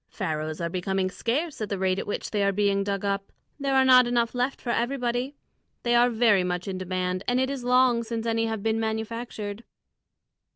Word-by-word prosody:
Pharaohs 155 -5 -3
are 170 - -1
becoming 185 +1 -1
scarce 280 - -2
at 210 - -2
the 200 - -2
rate 185 0 +1
at - - -5
which 205 - -4
they 210 - 0
are 200 - +3
being 200 0 +1
dug 200 0 -2
up; 200 0 -2 0.3
there 275 -1 0
are 265 0 +5
not 255 -1 +7
enough 235 -1 +1
left 250 +2 -1
for 240 - -3
everybody. 245 +2 -1 0.5
They 240 - +1
are 240 +1 +5
very 220 -5 +3
much 180 0 -3
in 190 -1 -3
demand, 185 0 -2
and 245 +1 +2
it 260 +1 +1
is 270 -3 -5
long 250 -1 +4
since 230 0 -4
any 225 0 +1
have 220 -2 -3
been 225 0 +1
manufactured." 220 -1 -4
225 Hz, 205 wpm, -26 LUFS, 195-245 Hz, 0.5 s, not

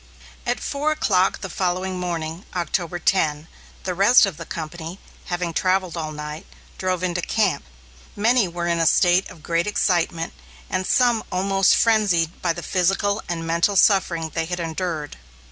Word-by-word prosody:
At - - 0
four 290 +2 -1
o'clock 190 -11 +1
the - - -4
following 185 +1 -2
morning, 170 -1 -4
October 175 0 -1
10, 160 -3 +1 0.4
the 185 - -2
rest 205 +7 +6
of 190 -6 -5
the 165 - -8
company, 165 +2 -6 0.3
having 175 -2 -3
travelled 185 0 +1
all 155 -2 -4
night, 150 +1 -7 0.3
drove 185 -1 -1
into 180 -1 -1
camp. 200 - 0 0.5
Many 225 0 +3
were 175 0 -4
in 170 -1 +1
a 165 - +3
state 180 +3 +4
of 170 -4 -14
great 170 +3 0
excitement, 170 -5 0 0.4
and 185 0 -1
some 240 -3 +3
almost 195 +1 +3
frenzied 195 -8 +2
by 175 - +1
the 170 0 -5
physical 195 +3 +1
and 165 -1 -3
mental 170 +5 +1
suffering 180 -5 +3
they 165 -1 -1
had 175 +1 -4
endured. 165 -2 -4
180 Hz, 160 wpm, -22 LUFS, 165-195 Hz, 0.5 s, rest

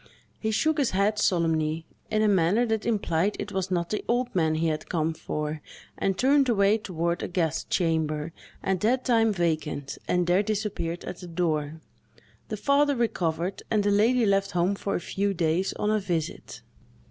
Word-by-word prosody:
He 220 - -1
shook 310 +8 +1
his 275 - +2
head 210 +2 +2
solemnly, 160 -4 +1 0.2
in 215 0 +1
a - - +4
manner 200 +4 +3
that 220 -1 -1
implied 205 -3 +1
it 205 - -5
was 190 -1 -2
not 170 -2 -1
the 215 - -2
old 245 +1 0
man 160 -3 +2
he 160 +1 0
had 155 -1 -2
come 160 -2 0
for, 150 -1 -4 0.3
and 195 -1 -1
turned 275 +2 +4
away 205 -1 +3
toward 170 -4 -2
a - - -2
guest 165 -3 -1
chamber, 160 -2 0 0.3
at 190 -1 0
that 250 +6 +1
time 225 -2 +3
vacant, 155 -6 -2
and 180 0 +2
there 175 +3 +3
disappeared 205 -5 -3
at 180 - -6
the 180 - -9
door. 160 -3 -2 0.7
The - - -3
father 285 0 +3
recovered, 180 -6 -1
and 215 -2 +2
the 205 - +2
lady 225 +4 +3
left 195 -1 +1
home 180 +2 +2
for 200 0 -3
a - - 0
few 200 +2 -2
days, 165 +3 +1
on 210 - -1
a 215 - +2
visit. 175 -6 -4
190 Hz, 180 wpm, -26 LUFS, 165-215 Hz, 0.7 s, a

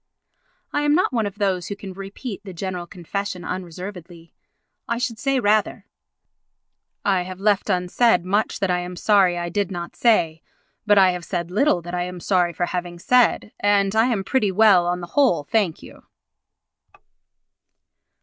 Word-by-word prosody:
I 290 - +1
am 295 0 +3
not 345 -5 +1
one 225 -4 +1
of 200 - -8
those 190 -4 -1
who 200 - -4
can 195 -1 -9
repeat 195 +3 -7
the 190 -3 -9
General 180 -1 -5
Confession 185 +1 -5
unreservedly. 180 -1 -8 0.5
I 235 - -1
should 240 -2 -3
say 275 -1 +1
rather: 215 -2 +1 1.2
"I 190 -3 +2
have 185 +1 -7
left 205 0 +1
unsaid 180 +1 +2
much 205 +4 0
that 195 -2 +1
I 180 - +1
am 180 0 -6
sorry 190 -2 +3
I 175 0 -3
did 200 +2 -1
not 175 -2 -6
say, 165 -9 +2 0.5
but 205 -1 +5
I 190 -2 +6
have 180 -1 -5
said 175 -1 -4
little 205 - +2
that 175 +1 -8
I 180 - -1
am 180 0 -5
sorry 180 -1 +1
for 175 +1 -2
having 175 -1 -4
said, 245 +2 +2
and 200 0 +2
I 225 +2 +4
am 220 -6 -1
pretty 210 -1 +1
well 190 -3 +5
on 180 0 -1
the - - -5
whole, 250 - +3
thank 195 0 -1
you." - - -13
190 Hz, 170 wpm, -22 LUFS, 175-210 Hz, 1.2 s, I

